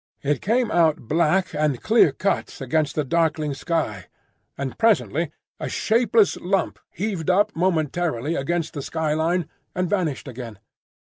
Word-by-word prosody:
It 145 0 0
came 235 +2 +1
out 160 -8 +2
black 170 +5 +2
and 150 -5 0
clear 220 -9 +4
cut 195 +8 -2
against 140 +2 0
the 150 - +1
darkling 155 0 0
sky; 135 - -2 0.5
and 135 -1 -4
presently 190 -8 +2 0.3
a - - -3
shapeless 225 -2 +2
lump 190 +2 -1
heaved 185 -4 -3
up 195 +3 +3
momentarily 160 -4 0
against 165 +3 -1
the 145 - -4
sky 155 +1 -1
line 165 +2 0 0.3
and 180 0 0
vanished 170 -8 -1
again. 120 -4 -8
165 Hz, 140 wpm, -23 LUFS, 145-185 Hz, 0.5 s, clear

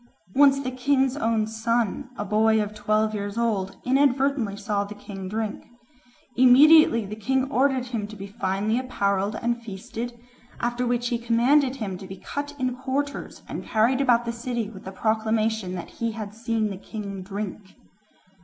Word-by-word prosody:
Once 275 0 +6
the 260 -2 -3
king's 265 +1 +1
own 225 -5 +1
son, 230 +3 -1
a 205 - -3
boy 220 +2 +3
of 210 0 -2
twelve 215 +1 +1
years 205 0 -4
old, 210 -5 -1
inadvertently 265 -4 +2
saw 205 -1 -1
the 205 +1 -8
king 195 -2 -8
drink. 215 0 -4 0.7
Immediately 260 -1 +7
the 205 +2 -6
king 260 +5 0
ordered 265 -1 +2
him 230 -4 -3
to 215 - -10
be 195 -1 -7
finely 200 +3 -1
apparelled 200 -5 0
and 235 0 0
feasted, 230 +3 -6 0.4
after 240 +1 -1
which 240 0 0
he 240 - -1
commanded 250 +4 +3
him 200 -8 -4
to 190 - -9
be 190 0 -8
cut 290 +8 -5
in 255 -2 -1
quarters, 270 +2 -3
and - - -5
carried 235 +5 +2
about 240 -3 +3
the 235 - -1
city 235 -2 -3
with 190 -3 -11
a - - -5
proclamation 220 -1 0
that 175 - -7
he 230 -1 -3
had 210 -2 -6
seen 225 -1 -1
the 195 - -5
king 200 -1 -6
drink. 195 0 -6
225 Hz, 170 wpm, -25 LUFS, 205-255 Hz, 0.7 s, Immediately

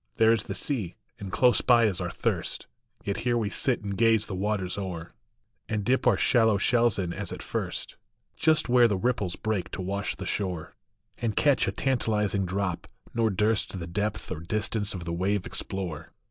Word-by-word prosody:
There 110 0 +5
is 110 -3 -1
the - - -4
sea; 110 - -1 0.2
and 100 -2 -6
close 125 +3 +4
by 120 -2 +5
is 100 -5 0
our - - -2
thirst, - - -2 0.4
Yet 100 - -2
here 120 -1 +1
we 110 -3 -1
sit 130 -5 +1
and 100 -1 -3
gaze 115 0 +4
the 105 - -6
waters 95 -1 -1
o 95 -2 -3
er, 85 +1 -9 0.6
And 110 -2 -1
dip 130 +3 +2
our 115 -6 +5
shallow 115 -4 +4
shells 120 +1 +3
in 90 -3 -2
as - - -4
at - - -6
first, - - -4 0.4
Just 155 -1 +2
where 120 -1 +6
the 100 -4 0
ripples 100 -4 0
break 105 -4 -2
to - - -3
wash 100 +2 -2
the - - -7
shore, 90 -6 -3 0.5
And 115 -3 -1
catch 145 -2 +3
a - - +1
tantalizing 105 -7 0
drop, 95 -1 -2 0.3
nor 115 -1 +2
durst 105 0 0
The 85 - -5
depth 105 +4 -3
or - - -3
distance 105 +4 -1
of 85 -2 -6
the 85 - -3
wave 95 +3 0
explore. 95 0 -3
206 - - -14
LIFE. - - -38
105 Hz, 200 wpm, -27 LUFS, 95-115 Hz, 0.6 s, where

